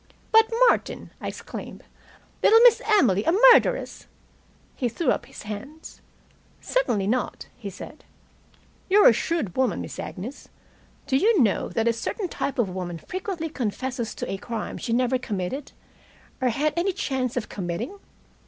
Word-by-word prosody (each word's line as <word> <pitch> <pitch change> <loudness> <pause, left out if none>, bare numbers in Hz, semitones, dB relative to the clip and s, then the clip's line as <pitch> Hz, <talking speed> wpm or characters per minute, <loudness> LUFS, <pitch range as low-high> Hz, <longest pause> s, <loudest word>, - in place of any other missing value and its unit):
"But, 445 +1 +5 0.2
Martin!" - - 0
I - - -4
exclaimed. - - -8 0.6
"Little 450 - +7
Miss 480 -1 +7
Emily 255 - +4
a 330 - +2
murderess." 470 +6 +4 0.7
He 245 - -1
threw 255 +4 0
up - - -2
his - - -11
hands. 220 +10 -9 0.6
"Certainly 365 - 0
not," 245 +5 -1
he 210 -5 -7
said. 190 - -11 0.9
"You're 405 +2 +7
a - - +8
shrewd 265 - -2
woman, 260 -1 +1
Miss - - -7
Agnes. 225 +9 -7 0.6
Do 265 - +2
you 420 +5 +3
know 210 - 0
that 225 0 -1
a 235 - +3
certain 355 - -4
type 280 - -3
of 240 -5 +2
woman 180 -2 -5
frequently 360 - -5
confesses 245 -3 -3
to - - -5
a 195 - -2
crime 225 +2 -5
she 235 - -4
never 250 +2 +2
committed, 220 +5 -4 0.7
or 255 - +3
had 295 +6 0
any 365 +3 0
chance 260 - -2
of 230 - -2
committing? 205 - -5
255 Hz, 155 wpm, -25 LUFS, 215-340 Hz, 0.9 s, a